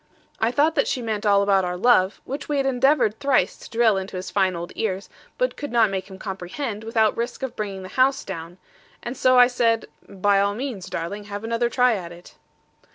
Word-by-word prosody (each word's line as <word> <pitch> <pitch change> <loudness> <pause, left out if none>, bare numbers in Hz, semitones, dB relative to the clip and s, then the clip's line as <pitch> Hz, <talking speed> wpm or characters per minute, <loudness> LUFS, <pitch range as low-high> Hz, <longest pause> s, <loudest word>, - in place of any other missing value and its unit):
I 225 - +2
thought 295 +6 +2
that - - +1
she - - -1
meant 220 -3 -2
all 200 -1 +4
about 195 -1 +3
our 180 0 -2
love, 195 -2 +3
which 275 +3 -6
we 295 - 0
had 275 - +1
endeavoured 260 -4 +2
thrice 275 -2 +2
to - - -12
drill 225 -3 +3
into 190 0 -5
his 185 0 -5
fine 190 -2 +1
old 170 +1 -6
ears; 195 -3 -3 0.3
but - - 0
could 290 - -6
not 230 -4 +3
make 190 0 -4
him 190 - -10
comprehend, 200 +4 -5
without 220 -1 +2
risk 235 +3 -4
of 255 -2 -4
bringing 195 -3 -5
the - - -7
house 265 +6 +2
down: 170 -2 -7 0.5
and 240 - -5
so 255 0 +4
I 245 - +9
said, 235 -2 +1 0.2
'By 200 0 +2
all 200 0 0
means; 225 -7 -5
darling; 200 +5 -5
have 205 +1 -6
another 230 +1 0
try 250 0 +3
at 180 -5 -5
it.' 175 +1 -14
215 Hz, 220 wpm, -23 LUFS, 190-250 Hz, 0.5 s, I